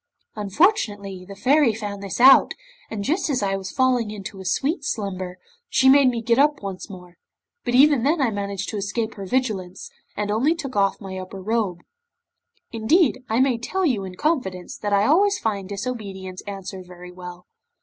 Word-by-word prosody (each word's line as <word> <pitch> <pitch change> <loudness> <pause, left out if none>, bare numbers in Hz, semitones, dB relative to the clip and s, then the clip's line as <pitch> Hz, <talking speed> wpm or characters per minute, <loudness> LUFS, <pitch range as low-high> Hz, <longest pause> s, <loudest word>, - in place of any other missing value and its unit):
Unfortunately, 205 - 0
the 200 - -9
Fairy 265 +1 +3
found 205 -2 -5
this 200 +2 -5
out, 265 +2 +7 0.3
and 210 -2 -4
just 315 - 0
as 255 -7 0
I 195 -1 0
was 190 -1 -5
falling 255 -4 +1
into 200 -2 -8
a - - -10
sweet 285 - 0
slumber, 185 -7 -4 0.3
she 265 - +3
made 275 -1 +6
me 235 -2 -3
get 235 +2 +2
up 295 0 +3
once 195 +1 -6
more, 180 -2 -12 0.4
but 245 - -1
even 285 -1 +6
then 300 +6 +2
I 260 -5 +2
managed 200 -1 -4
to 215 - -4
escape 220 +3 -2
her 195 -2 -8
vigilance, 200 -7 -2 0.3
and 205 0 -1
only 265 +10 +2
took 275 -6 -6
off 195 -1 +2
my 190 -2 -7
upper 185 +1 -8
robe. 200 -3 -1 0.9
Indeed, 255 +4 +2
I 225 +2 +1
may 260 -3 +2
tell 375 +10 -1
you 240 - +1
in 185 -1 -7
confidence, 190 - -2
that 205 - -4
I 200 +1 +3
always 395 - +4
find 200 - -3
disobedience 200 -4 -5
answer 195 -1 -6
very 180 0 -12
well. 180 0 -10
210 Hz, 180 wpm, -23 LUFS, 195-260 Hz, 0.9 s, out